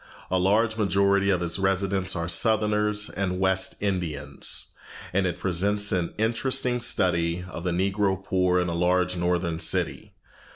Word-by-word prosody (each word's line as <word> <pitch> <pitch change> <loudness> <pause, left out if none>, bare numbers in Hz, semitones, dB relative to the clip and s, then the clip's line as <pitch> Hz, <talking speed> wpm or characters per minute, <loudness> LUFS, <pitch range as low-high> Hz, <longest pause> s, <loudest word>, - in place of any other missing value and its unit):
A 95 - +2
large 110 +4 +2
majority 100 -1 +2
of 90 -3 +1
its 85 +2 -1
residents 95 0 0
are 85 -1 -2
Southerners 105 +2 +2
and 90 -1 -3
West 95 0 +1
Indians, 80 -8 -2 0.4
and 95 0 +1
it 90 - -3
presents 100 +3 +1
an 90 -4 -1
interesting 120 +2 0
study 90 -5 +1
of 85 -2 -8
the 90 - -1
Negro 95 +2 0
poor 90 -1 +1
in 90 - 0
a 85 - -2
large 90 +1 +1
northern 85 -1 -1
city. - - -1
95 Hz, 150 wpm, -25 LUFS, 90-100 Hz, 0.4 s, A